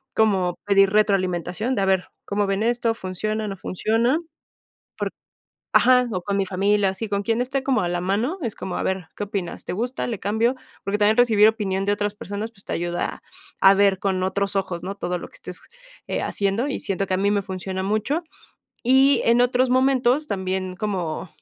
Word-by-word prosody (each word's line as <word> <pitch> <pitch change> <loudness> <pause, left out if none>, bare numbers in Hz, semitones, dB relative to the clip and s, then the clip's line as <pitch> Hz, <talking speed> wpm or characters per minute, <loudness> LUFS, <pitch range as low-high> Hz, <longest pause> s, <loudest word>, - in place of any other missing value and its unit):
como 190 -5 +2
pedir 195 -1 +5
retroalimentación, 195 +2 +1
de 200 - 0
a - - +2
ver, 190 -1 +1 0.2
¿cómo 205 0 0
ven 195 +2 0
esto? 235 0 +1
¿Funciona, 215 +3 -3
no 195 -1 -5
funciona? 225 - +1 0.8
Por - - -1 0.6
ajá, 250 0 +5
o 185 -3 -2
con 200 +1 -1
mi 195 - +1
familia, 200 +2 +2
así, 195 +4 -4
con 200 0 0
quien 225 +1 0
esté 265 +2 -2
como 265 -1 +2
a 175 - 0
la 175 0 -1
mano, 220 - 0
es 230 - -3
como, 190 - -5
a - - -2
ver, 190 -3 -2
¿qué 205 - -4
opinas? 195 -4 -4
¿Te - - -4
gusta? 245 +6 -2
¿Le 225 -5 -3
cambio? 220 +5 +1 0.3
Porque 200 +1 -1
también 210 +1 +4
recibir 220 -4 +6
opinión 195 -3 0
de 205 - +2
otras 205 0 -1
personas, 205 +2 -5
pues 195 -3 -15
te - - -4
ayuda 175 +1 -2 0.4
a 195 0 +8
ver 195 -1 +3
con 190 -2 0
otros 200 +1 -1
ojos, 185 -3 -3
¿no? 195 +2 -4
Todo 180 -2 -2
lo - - -9
que - - -19
estés, 180 - -8 0.5
eh, - - -2
haciendo, 200 +6 0
y 280 - -3
siento 195 0 -2
que - - -1
a - - -1
mí 200 +2 +2
me 205 - +1
funciona 190 0 -4
mucho. 215 - 0 0.6
Y 265 +3 +5
en 235 +1 +5
otros 250 +1 +2
momentos, 260 +2 +3
también 185 -1 -2
como, 185 -5 -3
200 Hz, 200 wpm, -23 LUFS, 190-230 Hz, 0.8 s, a